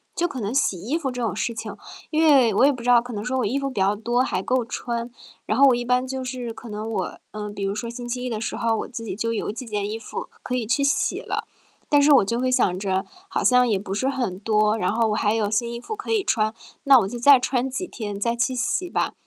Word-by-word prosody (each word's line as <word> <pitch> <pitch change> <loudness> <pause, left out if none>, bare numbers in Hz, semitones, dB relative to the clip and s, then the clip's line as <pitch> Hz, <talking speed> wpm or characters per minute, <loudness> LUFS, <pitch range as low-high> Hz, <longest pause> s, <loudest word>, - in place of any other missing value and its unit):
就 345 - +1
可 270 -7 -6
能 205 +2 -2
洗 230 -9 +1
衣 240 - -2
服 280 -6 -3
这 250 - -6
种 215 -5 -1
事 230 +2 -2
情 220 - -6 0.4
因 315 0 +2
为 270 -8 +5
我 245 - +5
也 290 - +5
不 250 -3 -7
知 245 - 0
道 240 -1 +7
可 245 0 -8
能 210 0 -4
说 260 +1 -1
我 - - +1
衣 250 +7 -1
服 275 - -2
比 255 - -5
较 195 +2 +3
多， 240 +4 0
还 185 - -1
够 255 +2 +1
穿。 235 +1 -4 0.4
然 215 - 0
后 280 - +7
我 260 - +5
一 240 - -2
般 250 +1 +2
就 260 0 -4
是 250 -2 -4
可 225 +2 -11
能 215 +1 -5
我 - - -3
嗯， 210 -1 -6
比 200 - -5
如 195 0 0
说 235 +2 -4
星 240 +1 -7
期 250 +1 -3
一 250 - -2
的 220 -3 -3
时 - - -3
候， 230 -1 +1
我 - - -4
自 235 -2 -7
己 200 - -4
就 230 +2 -2
有 220 - -2
几 230 +4 -7
件 205 -2 -2
衣 220 - -3
服 225 - -6 0.2
可 250 - -2
以 245 -3 -1
去 280 +5 +1
洗 280 - +1
了。 - - -4 0.4
但 290 -1 +5
是 290 +1 +5
我 250 - +5
就 230 +4 -1
会 255 +1 +1
想 215 -8 +2
着， 190 -1 -1 0.2
好 - - -1
像 250 -1 +5
也 215 -4 +2
不 195 0 -5
是 235 +6 0
很 245 -9 -2
多， 215 0 +2
然 185 -3 0
后 225 0 +2
我 210 - 0
还 210 0 +1
有 215 -2 0
新 235 +2 0
衣 235 - -5
服 435 - -6
可 420 - -6
以 435 -3 +2
穿， 215 - +1 0.3
那 275 -1 +8
我 190 - -1
就 240 - -5
再 275 +2 +7
穿 255 0 0
几 355 +8 -4
天 205 -8 -6
再 235 +3 0
去 240 +2 0
洗 300 +8 -1
吧。 - - -1
235 Hz, 310 characters per minute, -23 LUFS, 215-255 Hz, 0.4 s, 那